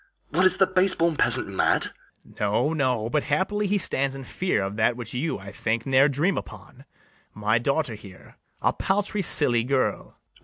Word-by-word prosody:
what, 180 Hz, +5 st, +4 dB
is 185 Hz, -, -2 dB
the 190 Hz, -, +5 dB
base 185 Hz, 0 st, +1 dB
born 165 Hz, -1 st, +1 dB
peasant -, -, 0 dB
mad? -, -, 0 dB, 0.3 s
BARABAS. -, -, -19 dB
No, 105 Hz, +9 st, +1 dB
no; 130 Hz, -7 st, 0 dB
but 150 Hz, -, +2 dB
happily 200 Hz, +9 st, -1 dB
he 205 Hz, +1 st, +1 dB
stands 140 Hz, -7 st, +1 dB
in 135 Hz, -, -7 dB
fear 130 Hz, -, -1 dB
Of 100 Hz, +1 st, -4 dB
that 110 Hz, +2 st, +2 dB
which 120 Hz, -3 st, -7 dB
you, 145 Hz, +6 st, -2 dB
I 100 Hz, 0 st, -10 dB
think, 115 Hz, +2 st, -2 dB
ne'er 135 Hz, +2 st, +4 dB
dream 155 Hz, +8 st, 0 dB
upon, -, -, -13 dB, 0.5 s
My 105 Hz, +2 st, +1 dB
daughter 140 Hz, 0 st, -1 dB
here, 100 Hz, -3 st, -13 dB, 0.3 s
a -, -, +3 dB
paltry 205 Hz, +1 st, -1 dB
silly 120 Hz, -10 st, +3 dB
girl. 130 Hz, +1 st, -1 dB
140 Hz, 185 wpm, -25 LUFS, 115-180 Hz, 0.5 s, the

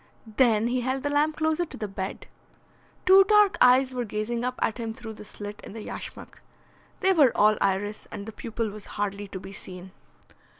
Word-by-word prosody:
Then 230 Hz, -3 st, +4 dB
he 250 Hz, +1 st, 0 dB
held 260 Hz, +2 st, -2 dB
the 290 Hz, -, -1 dB
lamp 300 Hz, +1 st, +1 dB
closer 315 Hz, +2 st, +1 dB
to 335 Hz, -, -8 dB
the 210 Hz, -, -4 dB
bed. 195 Hz, -1 st, -5 dB, 0.8 s
Two 385 Hz, +1 st, +8 dB
dark 420 Hz, -1 st, +5 dB
eyes 255 Hz, +1 st, +5 dB
were 250 Hz, -1 st, -2 dB
gazing 230 Hz, +2 st, -3 dB
up 250 Hz, 0 st, -1 dB
at 225 Hz, -, -1 dB
him 225 Hz, -1 st, -3 dB
through 230 Hz, -3 st, -8 dB
the 210 Hz, -, -11 dB
slit 205 Hz, 0 st, -8 dB
in -, -, -9 dB
the 220 Hz, -1 st, -7 dB
yashmak. -, -, -8 dB, 0.6 s
They 380 Hz, 0 st, +4 dB
were 285 Hz, -9 st, +4 dB
all 215 Hz, +1 st, +5 dB
iris, 205 Hz, +2 st, -1 dB
and 200 Hz, -, -6 dB
the 220 Hz, -, -7 dB
pupil 225 Hz, 0 st, -4 dB
was 210 Hz, 0 st, -10 dB
hardly 205 Hz, 0 st, -2 dB
to 190 Hz, -, -7 dB
be 195 Hz, +1 st, -10 dB
seen. 185 Hz, -1 st, -9 dB
230 Hz, 200 wpm, -26 LUFS, 205-265 Hz, 0.8 s, Two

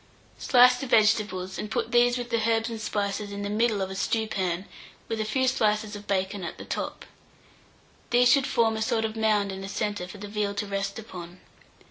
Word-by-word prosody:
Slice 250 Hz, 0 st, +6 dB
the 270 Hz, -, -5 dB
vegetables, 210 Hz, -5 st, +2 dB
and 210 Hz, -, -4 dB
put 235 Hz, -1 st, -2 dB
these, 245 Hz, 0 st, +4 dB
with 245 Hz, 0 st, -5 dB
the 230 Hz, -1 st, +1 dB
herbs 225 Hz, +1 st, +1 dB
and 225 Hz, -1 st, -5 dB
spices, 205 Hz, -1 st, -2 dB
in 200 Hz, 0 st, -5 dB
the 205 Hz, -, -3 dB
middle 215 Hz, -2 st, +1 dB
of 190 Hz, -, -5 dB
a -, -, -5 dB
stewpan, 195 Hz, -4 st, -1 dB, 0.4 s
with 225 Hz, -1 st, -2 dB
a -, -, -1 dB
few 260 Hz, +4 st, +1 dB
slices 215 Hz, -3 st, +1 dB
of 205 Hz, 0 st, -10 dB
bacon 195 Hz, 0 st, -1 dB
at 170 Hz, -, -5 dB
the -, -, -9 dB
top: -, -, -4 dB, 1.0 s
these 245 Hz, 0 st, +5 dB
should 275 Hz, -2 st, +4 dB
form 225 Hz, -1 st, +2 dB
a -, -, -3 dB
sort 220 Hz, 0 st, +1 dB
of 220 Hz, 0 st, -4 dB
mound 215 Hz, -3 st, +1 dB
in 190 Hz, 0 st, -6 dB
the 195 Hz, -, -6 dB
centre 205 Hz, -3 st, -2 dB
for 195 Hz, -, -10 dB
the 205 Hz, +1 st, -7 dB
veal 205 Hz, -1 st, -2 dB
to 205 Hz, +1 st, -2 dB
rest 195 Hz, 0 st, -3 dB
upon. 180 Hz, -5 st, -9 dB
215 Hz, 210 wpm, -26 LUFS, 200-230 Hz, 1.0 s, Slice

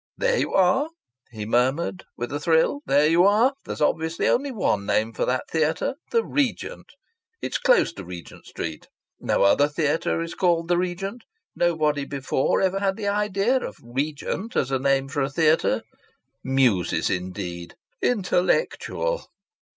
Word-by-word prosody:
"There -, -, +2 dB
you -, -, -1 dB
are!" 195 Hz, -, +3 dB, 0.4 s
he 110 Hz, -3 st, -6 dB
murmured, 130 Hz, -, 0 dB
with 120 Hz, +3 st, -4 dB
a 145 Hz, -, -1 dB
thrill. 160 Hz, -, +2 dB
"There 145 Hz, +2 st, +4 dB
you 165 Hz, +3 st, +4 dB
are! 220 Hz, +7 st, +4 dB
There's -, -, -6 dB
obviously 160 Hz, +2 st, +1 dB
only 280 Hz, +3 st, +2 dB
one 180 Hz, -, 0 dB
name 110 Hz, +3 st, 0 dB
for -, -, -1 dB
that 125 Hz, 0 st, -1 dB
theatre 160 Hz, +5 st, 0 dB, 0.2 s
'The 460 Hz, -1 st, +1 dB
Regent.' 290 Hz, -, -2 dB, 0.5 s
It's -, -, -3 dB
close -, -, +3 dB
to 95 Hz, -, -8 dB
Regent 90 Hz, -1 st, -10 dB
Street. 80 Hz, -1 st, -6 dB, 0.3 s
No -, -, +1 dB
other 120 Hz, +9 st, +5 dB
theatre 150 Hz, +2 st, 0 dB
is 165 Hz, -, -6 dB
called 170 Hz, -2 st, +1 dB
'The 175 Hz, -, +3 dB
Regent.' 195 Hz, +6 st, -4 dB, 0.3 s
Nobody 155 Hz, -4 st, +1 dB
before 135 Hz, -1 st, 0 dB
ever 190 Hz, 0 st, +1 dB
had 195 Hz, -1 st, 0 dB
the 205 Hz, -2 st, -1 dB
idea 210 Hz, +4 st, +1 dB
of -, -, -6 dB
'Regent' 145 Hz, -, -3 dB
as 130 Hz, -, 0 dB
a 135 Hz, -, +1 dB
name 135 Hz, 0 st, +1 dB
for 140 Hz, +1 st, -2 dB
a 135 Hz, -, 0 dB
theatre. 155 Hz, +2 st, +2 dB, 0.6 s
'Muses' 125 Hz, -9 st, +2 dB
indeed!... 90 Hz, -1 st, -5 dB, 0.3 s
'Intellectual'! 245 Hz, -, 0 dB
160 Hz, 150 wpm, -24 LUFS, 130-195 Hz, 0.6 s, other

